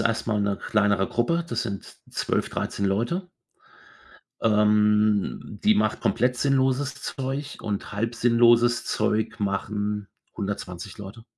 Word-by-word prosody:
erstmal 110 -2 0
'ne 100 -1 0
kleinere 105 -2 +1
Gruppe. 165 +9 0
Das 115 -6 -2
sind 100 -6 -4 0.3
12, - - -1
13 100 - -2
Leute. 120 - -1 1.1
Ähm, 105 -1 +2
die 110 - +5
macht 105 0 +1
komplett 125 +2 +1
sinnloses 135 0 +1
Zeug 135 +2 -5
und 105 -2 -4
halb 115 +3 -2
sinnloses 120 0 +4
Zeug 110 0 0
machen 105 0 -2 0.3
120 100 -2 -5
Leute. 105 +3 -10
110 Hz, 115 wpm, -25 LUFS, 105-120 Hz, 1.1 s, die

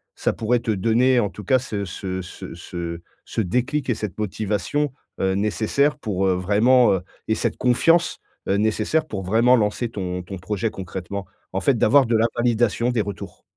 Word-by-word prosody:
ça - - 0
pourrait 120 +2 +1
te 115 - -6
donner 115 +5 +3
en 105 - +1
tout 105 - -10
cas 130 +7 +4
ce 105 -5 -4
ce 95 +1 -4
ce 90 - -9
ce 85 0 -6 0.2
ce - - -2
déclic 125 +8 -1
et 120 - +2
cette 105 -3 -5
motivation, 105 +7 -1 0.3
heu, 95 0 +2
nécessaires 110 +8 +1
pour, 95 -8 -1
heu, 95 - +3
vraiment, 105 +6 +4
heu 95 - 0 0.3
et 110 - +2
cette 115 0 -1
confiance, 165 +8 +3 0.3
heu, 95 - +3
nécessaire 110 +9 +1
pour 95 -7 -4
vraiment 115 +7 +4
lancer 110 +2 0
ton 90 -4 -4
ton 95 +2 -7
projet 100 +4 -2
concrètement? 95 +1 -6 0.3
En 95 - -1
fait 135 +1 +2
d'avoir 135 +5 +5
de 115 - +2
la 110 - +3
validation, 120 0 +2
des 120 -3 +1
retours? 100 -3 -7
110 Hz, 185 wpm, -23 LUFS, 95-120 Hz, 0.3 s, d'avoir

